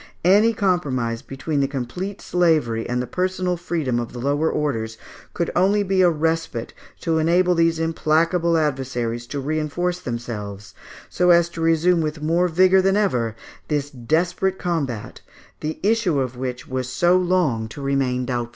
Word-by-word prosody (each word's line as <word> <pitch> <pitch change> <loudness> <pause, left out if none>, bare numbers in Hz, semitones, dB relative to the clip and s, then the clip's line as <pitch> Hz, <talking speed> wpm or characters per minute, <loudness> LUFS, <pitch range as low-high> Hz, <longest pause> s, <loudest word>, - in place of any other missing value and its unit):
Any 205 +5 +5
compromise 140 - 0
between 140 +2 -3
the 135 - +2
complete 150 +9 -5
slavery 155 -11 +1
and 125 0 0
the 125 - -1
personal 185 +2 -1
freedom 165 -8 -2
of 120 - -5
the - - -7
lower 145 +5 +1
orders, 115 -7 -2 0.4
could 170 - -1
only 200 +3 +3
be 190 -1 +1
a 180 - +6
respite 160 -6 -2 0.3
to 165 -2 +1
enable 175 +3 +3
these 165 -1 +2
implacable 165 +1 +1
adversaries 125 -6 -2
to 145 - -4
reinforce 155 +5 -2
themselves, 105 - -6 0.3
so 180 0 +1
as 170 -1 +5
to 165 -1 -7
resume 165 +1 +3
with 155 0 -3
more 165 +4 +1
vigour 185 +3 +4
than 195 +1 +2
ever 125 - 0 0.3
this 145 -1 -1
desperate 170 +8 0
combat, 140 -11 -3 0.4
the 155 +1 -4
issue 205 -8 +2
of 130 -2 -2
which 125 0 -5
was 130 -1 -3
so 175 +7 +3
long 175 -11 +1
to 110 - -10
remain 135 -2 0
doubtful. 120 -2 -2
155 Hz, 160 wpm, -22 LUFS, 125-180 Hz, 0.4 s, a